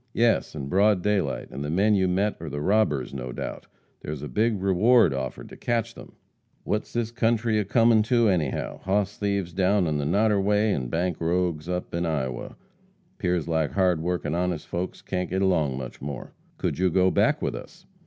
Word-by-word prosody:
"Yes, 115 -8 +2
in 70 -3 -5
broad 100 +3 +3
daylight, 100 -9 0
and 70 +2 -5
the 75 - -3
men 100 +7 +3
you 95 -2 +3
met 100 +4 +1
are 80 - -5
the 75 +1 -4
robbers, 75 - +1
no 65 -2 -5
doubt. - - -6 0.3
There's 75 -1 -6
a - - -4
big 110 - +1
reward 100 - +4
offered 65 -2 -5
to - - -11
catch 115 -1 -1
them." - - -13 0.5
"What's 105 - -2
this 115 -1 -2
country 115 -2 +1
a 105 - -1
comin' 115 +2 +4
to, 120 -3 +4
anyhow? 80 -9 -1
Hoss 100 +1 0
thieves 100 -4 -1
down 95 +1 +2
on 75 -2 0
the 70 - -2
Noderway, 105 +3 +2
an' 65 -3 -2
bank 85 +5 -2
rogues 85 -1 0
up 90 0 -3
to 85 - -2
Iowa. 70 -7 -3 0.6
'Pears 90 -3 0
like 80 -2 0
hard 90 -4 +2
workin' 85 -3 -2
honest 90 -2 -1
folks 90 +2 -4
can't 90 -2 -3
get 95 +2 0
along 80 -8 +1
much 65 -2 -7
more." 70 -1 -6 0.2
"Could - - -2
you 95 0 +3
go 95 +1 +3
back - - +2
with - - -2
us?" - - -10
90 Hz, 195 wpm, -25 LUFS, 80-105 Hz, 0.6 s, reward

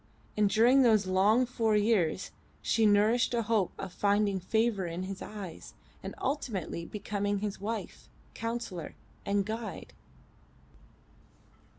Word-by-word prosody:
And 210 -1 +3
during 240 +6 +5
those 220 -5 +4
long 200 +7 +3
four 225 -3 0
years 205 -5 +1 0.3
she 225 -1 +3
nourished 215 +4 +3
a 230 - +1
hope 215 -4 +1
of 190 -2 -6
finding 200 0 +1
favour 215 0 0
in 170 +2 -4
his 190 0 -6
eyes 200 -6 -8 0.3
and - - -7
ultimately 220 - -3
becoming 205 -1 -2
his 200 -1 -4
wife, 220 +2 -5 0.2
counsellor, 230 -8 -5 0.3
and 200 0 +1
guide. 220 +1 -6
210 Hz, 120 wpm, -30 LUFS, 195-230 Hz, 0.3 s, during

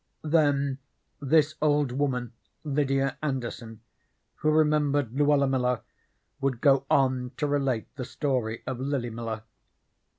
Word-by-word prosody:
Then 145 -3 +2 0.4
this 150 +2 +3
old 145 -3 +2
woman, 125 -3 -1 0.3
Lydia 135 -2 0
Anderson, 120 -6 -4 0.6
who 155 - +1
remembered 150 -4 +2
Luella 145 0 +3
Miller, 125 -2 0 0.6
would 135 -3 -1
go 135 0 +3
on 130 -2 +2
to 150 - 0
relate 135 -5 0
the 125 - -4
story 125 -7 -2
of 125 - -4
Lily 130 -3 -2
Miller. 110 -1 -5
135 Hz, 120 wpm, -27 LUFS, 125-145 Hz, 0.6 s, this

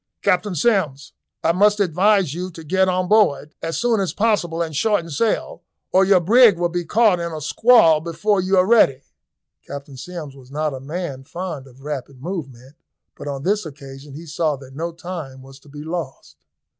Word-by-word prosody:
"Captain 185 0 +1
Sims, 150 - 0 0.3
I 165 - +3
must 205 +4 +3
advise 190 -2 +2
you 180 +3 -4
to 165 - -10
get 190 +4 +2
on 185 0 0
board 180 -8 +2
as 165 - -3
soon 235 -2 +1
as 190 -2 -1
possible 200 -7 0
and 160 -3 -2
shorten 170 -1 0
sail, 220 +10 -1 0.3
or 190 +1 +5
your 190 -1 +5
brig 215 +2 +5
will 175 0 0
be 175 0 -3
caught 210 0 +3
in 170 0 -3
a 155 - -5
squall 165 - +4
before 190 +5 0
you 190 +1 +1
are 185 - +5
ready." 190 - +4 0.6
Captain 140 -1 -8
Sims 155 -1 -8
was 130 -2 -16
not 150 +1 -2
a 130 - -6
man 145 -1 -5
fond 160 -3 -6
of 135 +1 -18
rapid 140 -3 -6
movement, 140 -5 -7 0.4
but - - -9
on 140 -1 -4
this 205 +4 +1
occasion 140 -2 -11
he 165 +3 -9
saw 155 -1 -1
that 135 -1 -13
no 165 +3 -3
time 165 -6 -8
was 135 0 -14
to 145 - -20
be 145 +1 -9
lost. 155 - -6
165 Hz, 190 wpm, -21 LUFS, 140-190 Hz, 0.6 s, or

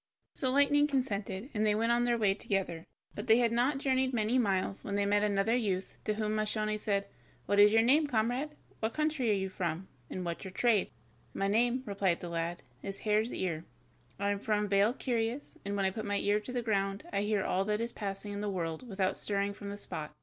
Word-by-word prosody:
So 260 - -1
Lightning 285 +2 +4
consented, 230 -4 -2
and 215 -1 0
they 210 -1 +3
went 230 +2 +2
on 240 0 +3
their 240 -1 +2
way 210 -3 +3
together, 195 -5 -3 0.3
but - - -6
they 225 0 +7
had 235 -2 +3
not 250 +4 +2
journeyed 260 -1 +1
many 225 +3 +2
miles 195 -3 0
when 200 - -3
they 200 0 +1
met 205 +1 +3
another 210 +2 +2
youth, 195 -6 -1
to 215 - 0
whom 215 0 -1
Moscione 215 0 0
said: 200 -1 0 0.4
"What 205 - +2
is 205 0 +8
your 225 +1 +5
name, 295 +6 +4
comrade, 255 +5 -1 0.2
what 220 +1 -2
country 305 -6 +1
are - - +4
you 190 -1 0
from, 180 -1 -3 0.2
and 185 - -4
what's 170 -1 -4
your 190 - -7
trade?" 220 -1 +2 0.5
"My 195 - 0
name," 240 +5 +2
replied 195 -4 0
the 175 - -6
lad, 170 0 -3 0.2
"is 195 0 -5
Hare's 215 +2 +1
ear, 165 -4 -2 0.6
I 200 0 +1
am 200 - -1
from 210 0 0
Vale 200 +4 +3
Curious, 240 +1 -2
and 200 0 -3
when 195 -1 +1
I 190 - +2
put 215 +2 -5
my 205 0 0
ear 205 +1 +2
to 215 +4 -8
the 245 -1 -2
ground 195 -2 0
I 200 - +1
hear 205 -1 +1
all 190 +1 +1
that 210 0 0
is 235 +1 -2
passing 205 0 -5
in 200 - -4
the 210 - -1
world 175 +4 -3
without 190 -2 0
stirring 200 0 0
from 200 0 -8
the 200 - -5
spot. 160 -6 -5
210 Hz, 225 wpm, -32 LUFS, 195-235 Hz, 0.6 s, is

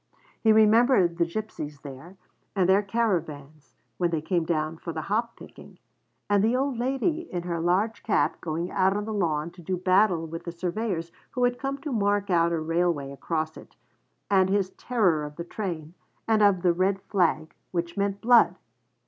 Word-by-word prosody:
He 220 - +5
remembered 215 -4 +4
the 170 - +3
gipsies 165 -7 -6
there, 145 +7 -11 0.4
and 185 -3 +2
their 190 +2 +5
caravans, 160 -9 -3 0.2
when 175 - +2
they 165 -2 -1
came 170 +1 -1
down 155 -1 -1
for 165 - -6
the 160 -1 -5
hop 230 +5 -1
picking; - - -14 0.5
and 205 -1 +3
the 230 +3 +2
old 265 -2 -1
lady 290 +7 -1
in 175 -1 -3
her 170 -1 -3
large 190 +7 0
cap 155 -8 0
going 170 +2 -3
out 190 +2 +2
on 210 - -3
the 220 - -4
lawn 165 -5 -1
to 175 - -14
do 180 +2 -2
battle 185 -2 +3
with 165 +1 -7
the 170 - -4
surveyors 175 0 -3 0.2
who 250 - -2
had 245 0 +1
come 275 0 -3
to 295 - -5
mark 205 -3 0
out 170 -1 +3
a 165 - 0
railway 165 -3 0
across 155 +2 -3
it; - - -14 0.5
and 190 -2 +3
his 195 -1 +1
terror 190 -10 +1
of 150 0 -7
the 170 - -5
train, 170 -4 -5 0.3
and 220 -1 +3
of 200 -3 +4
'the 175 -2 +4
red 190 +3 +1
flag, 165 -5 0 0.2
which 170 -1 -3
meant 200 0 -1
blood.' 230 -7 +5
180 Hz, 185 wpm, -26 LUFS, 165-215 Hz, 0.5 s, He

